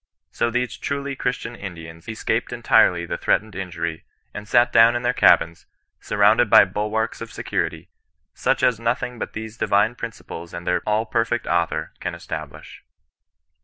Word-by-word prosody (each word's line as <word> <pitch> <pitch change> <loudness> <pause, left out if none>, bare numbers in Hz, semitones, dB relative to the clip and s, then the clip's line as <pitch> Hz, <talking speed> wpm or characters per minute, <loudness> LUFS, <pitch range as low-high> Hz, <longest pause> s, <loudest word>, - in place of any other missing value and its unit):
So 120 - 0
these 125 0 -2
truly 140 -1 -3
Christian 125 -2 -3
Indians 85 -5 -9
escaped 110 - -2
entirely 85 -1 +3
the 85 0 -4
threatened 110 0 0
injury, 85 -4 -4 0.3
and 105 0 -8
sat 120 +2 +3
down 115 +1 +6
in 120 - -2
their - - +1
cabins, 85 0 +3 0.3
surrounded 105 +2 +3
by - - +8
bulwarks 105 +3 -2
of - - -7
security, - - -3 0.5
such - - 0
as 120 -3 +3
nothing 120 +1 -2
but - - -5
these 110 +1 -7
divine 105 +2 +2
principles 105 -8 -8
and 85 0 -7
their 90 -1 +1
all 105 +1 +1
perfect 115 +1 -1
Author 85 -1 -1
can - - -4
establish. - - -8
110 Hz, 155 wpm, -22 LUFS, 90-120 Hz, 0.5 s, by